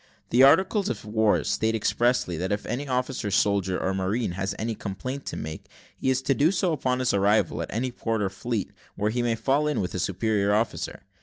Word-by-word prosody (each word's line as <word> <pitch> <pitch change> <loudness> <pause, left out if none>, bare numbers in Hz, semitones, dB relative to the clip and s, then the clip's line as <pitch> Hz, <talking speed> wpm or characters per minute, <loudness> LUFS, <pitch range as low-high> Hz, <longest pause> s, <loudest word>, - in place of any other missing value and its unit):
The 120 - +5
articles 190 +9 +5
of - - -4
war 110 0 +2
state 110 +1 0
expressly, 120 -3 +1
that 95 +4 -2
if 105 +1 -2
any 140 +4 -3
officer, 125 -4 -1
soldier 95 -2 +1
or 95 - -1
marine, 95 +4 -1
has 95 +2 -3
any 115 +1 -2
complaint 125 +7 -5
to - - -4
make, 80 0 -6 0.3
he - - -1
is 130 0 +1
to 135 - +2
do 150 +5 +3
so 185 -3 +1
upon 130 -4 0
his 130 -1 +1
arrival 100 +2 +2
at - - -5
any 125 +4 -1
port 115 -3 -2
or 95 - 0
fleet, 110 +2 -3 0.2
where 105 +1 0
he 120 +2 0
may 120 -1 +1
fall 140 +6 +1
in 150 - 0
with 90 - -2
a 95 - -2
superior 100 +2 +1
officer. 110 0 -2
115 Hz, 215 wpm, -26 LUFS, 100-130 Hz, 0.3 s, The